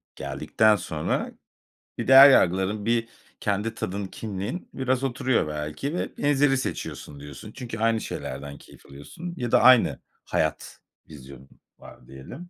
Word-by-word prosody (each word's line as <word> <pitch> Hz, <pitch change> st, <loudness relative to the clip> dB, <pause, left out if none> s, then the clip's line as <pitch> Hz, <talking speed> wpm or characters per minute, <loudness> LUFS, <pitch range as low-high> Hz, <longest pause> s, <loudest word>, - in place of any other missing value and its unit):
geldikten 110 Hz, -1 st, +1 dB
sonra 80 Hz, -5 st, -3 dB, 0.7 s
bir -, -, -4 dB
değer 135 Hz, +2 st, +10 dB
yargıların, 95 Hz, -2 st, +2 dB
bir 115 Hz, 0 st, +1 dB, 0.3 s
kendi 105 Hz, +2 st, -1 dB
tadın, 100 Hz, -2 st, -4 dB
kimliğin 105 Hz, -, -6 dB
biraz 130 Hz, 0 st, -1 dB
oturuyor 130 Hz, -, 0 dB
belki, 75 Hz, -, -4 dB
vb. 145 Hz, -3 st, +1 dB
seçiyorsun, 75 Hz, -, -5 dB
diyorsun. 70 Hz, -1 st, -10 dB
Çünkü 120 Hz, -3 st, -7 dB
aynı 115 Hz, 0 st, +1 dB
şeylerden 70 Hz, 0 st, -6 dB
keyif -, -, -18 dB
alıyorsun 115 Hz, -, -9 dB
ya 120 Hz, -5 st, -3 dB
da -, -, +5 dB
aynı 130 Hz, -2 st, +5 dB, 0.3 s
hayat -, -, -2 dB, 0.3 s
vizyonun 70 Hz, -3 st, -13 dB, 0.3 s
var -, -, -15 dB
diyelim. 70 Hz, -, -11 dB
110 Hz, 130 wpm, -25 LUFS, -, 0.7 s, değer